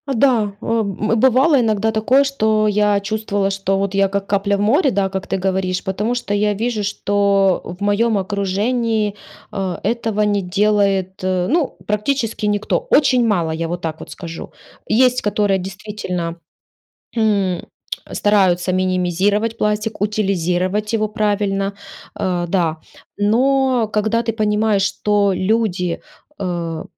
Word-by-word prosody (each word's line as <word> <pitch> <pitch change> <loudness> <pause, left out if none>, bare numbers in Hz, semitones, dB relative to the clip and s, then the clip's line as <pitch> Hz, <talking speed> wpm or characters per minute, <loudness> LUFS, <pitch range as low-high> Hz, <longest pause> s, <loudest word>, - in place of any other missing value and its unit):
Да, 225 -5 +2
о, 230 - -2
м, 215 +2 -1
бывало 265 +5 +4
иногда 220 -1 +1
такое, 235 +6 +3
что 220 -6 +1
я 210 -1 +2
чувствовала, 205 -1 -1
что 195 0 -1
вот 195 0 -1
я- 195 0 +3
как 200 0 -2
капля 200 0 +1
в 200 - -2
море, 275 - +3
да, 195 -3 0
как 190 0 -5
ты - - -1
говоришь, 185 -1 -1
потому 210 +5 -1
что 205 -5 -3
я 210 0 +2
вижу, 215 0 -2
что 200 -2 +1
в 180 +3 -8
моём 210 +2 +2
окружении, 205 +3 0 0.4
э, 190 -3 -3
этого 225 -1 -1
не 205 -1 +1
делает, 195 0 +1
э, 185 -1 0
ну 320 -2 +1
практически 215 +1 -1
никто. 205 0 0
Очень 250 -5 +4
мало, 175 -7 +1
я 165 +1 -3
вот 175 +1 -4
так 160 -1 -4
вот - - -10
скажу. 170 -2 -8 0.4
Есть 250 +2 +4
которые 205 -2 +1
действительно, 180 -3 -5 0.8
м, 200 -5 +1 0.5
стараются 185 -3 +2
минимизировать 185 +4 0
пластик, 210 0 -1
утилизировать 200 0 0
его 215 -1 +1
правильно. 205 -2 0 0.5
Э, 175 -2 0
да. 170 -3 +1 0.4
Но 250 +2 +2
когда 220 +2 +1
ты 230 - -1
понимаешь, 210 -2 +1
что 205 -2 +1
люди, 185 -4 0 0.4
э, 170 -4 -3
205 Hz, 140 wpm, -19 LUFS, 190-220 Hz, 0.8 s, бывало